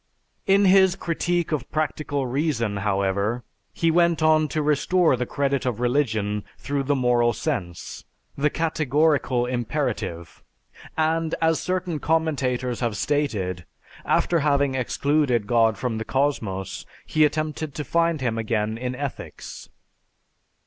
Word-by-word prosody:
In 200 +1 +5
his 190 -1 +5
"Critique 175 0 -1
of 140 -5 -2
Practical 150 -2 -2
Reason," 125 -6 -1
however, 100 +3 0 0.3
he 165 -1 +1
went 170 -1 +3
on 155 0 +4
to 155 +1 -2
restore 150 +2 +3
the 125 0 -3
credit 140 -1 0
of 125 -4 -2
religion 110 -5 0
through 140 0 -2
the 140 +1 +1
moral 120 -2 +2
sense, 100 - -4 0.3
the 145 +2 +1
"Categorical 150 -5 +1
Imperative," 120 - -3 0.6
and, 160 0 +1
as 160 -1 +2
certain 180 -3 -2
commentators 135 -7 0
have 115 -5 -1
stated, 100 -13 -1 0.4
after 170 - +2
having 140 -2 +2
excluded 130 -2 +1
God 115 -1 +3
from 115 -2 -2
the - - -2
cosmos, 100 -10 -1 0.2
he 155 - +2
attempted 155 -1 -1
to 150 - -3
find 165 -1 +1
Him 115 -3 -1
again 110 0 -1
in 125 0 -3
ethics. 140 0 -7
140 Hz, 130 wpm, -24 LUFS, 115-155 Hz, 0.6 s, In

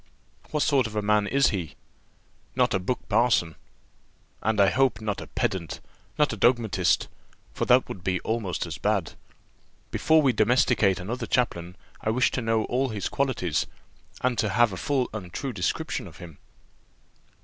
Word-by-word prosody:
"What 150 -1 0
sort 135 -5 +2
of 110 - -10
a 105 - -1
man 105 0 +2
is 140 +3 +3
he?" 90 -7 -4 0.8
"Not - - +2
a 95 - +2
buck 125 +7 -3
parson." 110 -7 +2 0.9
"And 110 -1 0
I 100 -1 +5
hope 135 -5 +2
not 105 -2 -3
a - - -8
pedant, 85 -5 -2 0.4
not 150 -5 +2
a - - -5
dogmatist, 120 -1 +2 0.5
for - - -2
that 125 +1 +4
would 90 - -8
be 90 -1 0
almost 110 -7 -2
as 80 -4 -7
bad. 100 -6 0 0.8
Before 160 -1 +3
we 130 -3 +3
domesticate 110 -4 +3
another 115 +6 -4
chaplain, 90 -8 -1 0.3
I - - -1
wish 125 +3 +2
to 125 - -2
know 115 -1 +1
all 130 +2 0
his 105 -3 -3
qualities, 120 - -1 0.5
and 125 -3 0
to 110 - +1
have 115 +1 +3
a - - -4
full 135 +4 0
and 95 -5 -6
true 135 +5 -4
description 90 -5 -2
of - - -14
him." 80 -4 -12
110 Hz, 170 wpm, -26 LUFS, 95-125 Hz, 0.9 s, I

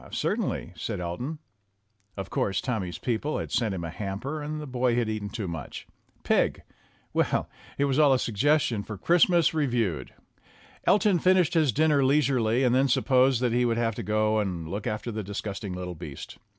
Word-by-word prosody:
"Certainly," - - -2
said - - -4
Elton. 90 - -4 0.8
Of 95 -1 -6
course, 95 -1 0
Tommy's 95 -9 -3
peo 115 +4 -1
ple 150 +5 -2
had - - -5
sent 110 -5 0
him 85 - -5
a 85 - -4
hamper, 105 - -4
and 150 +1 -4
the 150 - -6
boy 125 -2 0
had 120 -2 +1
eaten 110 -2 -3
too 105 -3 -4
much. 80 -5 -6 0.4
Pig! - - +1 0.5
Well, - - +1 0.3
it 140 - +2
was 140 +1 +1
all 150 -2 +6
a 130 - +5
suggestion 125 0 +1
for 105 0 -7
"Christ 170 - +4
mas 170 -3 +3
Reviewed." 120 - -1 0.8
Elton 205 -3 +4
finished 185 -1 +3
his 155 -5 +3
dinner 150 +1 +3
leisurely 130 -4 +2
and 125 -2 +3
then 135 +2 +3
supposed 130 -1 +3
that 125 -2 +1
he 125 +1 +2
would 115 -1 +1
have 115 -1 +1
to - - -5
go 110 +1 +1
and 90 -6 -3
look 100 +5 -4
after 110 +2 -3
the 110 0 -3
dis 100 +1 -5
gusting 100 -2 -5
little 90 0 -5
beast. 75 -5 -9
120 Hz, 190 wpm, -27 LUFS, 100-140 Hz, 0.8 s, all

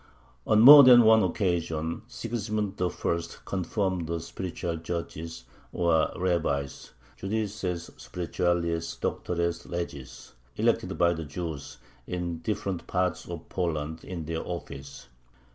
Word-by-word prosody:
On 110 0 +5
more 140 +4 +12
than 125 -2 +9
one 110 0 +6
occasion 85 -4 -1
Sigismund 105 -5 -3
I. 90 - +2 0.6
confirmed 95 -2 -1
the 85 0 -2
"spiritual 85 -1 -4
judges," 85 -2 -5 0.3
or 85 -3 +2
rabbis 80 -7 -1 0.3
(judices 95 -4 -3
spirituales, 85 -1 -2
doctores 85 -1 -2
legis), 85 -6 -6 0.2
elected - - 0
by 85 0 +4
the 80 -1 -5
Jews 75 -1 -6 0.3
in 90 -2 -3
different 95 -2 -3
parts 90 -2 -1
of 85 -2 -7
Poland, 80 -3 -3
in 85 -4 -6
their 80 +1 -3
office. 70 -5 -7
85 Hz, 110 wpm, -27 LUFS, 80-95 Hz, 0.6 s, more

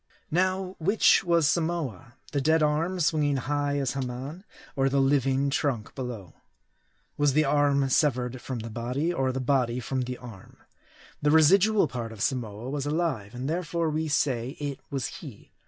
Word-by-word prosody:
Now, 185 +2 0
which 195 +7 +4
was 170 -4 +3
Samoa? 155 - -2 0.2
The 140 - 0
dead 160 +2 +3
arm 160 +5 0
swinging 150 -3 +2
high 145 +2 -1
as 135 -3 0
Haman? 135 +6 -5 0.3
Or 135 -1 +2
the 140 +1 +1
living 135 0 +2
trunk 135 -6 -1
below? 120 -8 -6 0.8
Was 145 -2 +3
the 155 +2 +3
arm 140 -1 +2
severed 125 -3 +1
from 130 - -5
the 115 0 -7
body, 125 +9 -2
or 135 -5 0
the 130 - -3
body 125 -2 +1
from 130 +2 -2
the 125 0 -4
arm? 115 -7 -12 0.6
The 150 - +2
residual 185 +6 +5
part 120 -3 -5
of 110 -2 -5
Samoa 115 -3 -2
was 145 -1 -3
alive, 145 -10 -2
and 125 +2 -4
therefore 165 0 -1
we 155 +1 -1
say 130 -3 0
it 145 -2 -4
was 135 -3 -2
he. - - -12
140 Hz, 165 wpm, -27 LUFS, 125-155 Hz, 0.8 s, residual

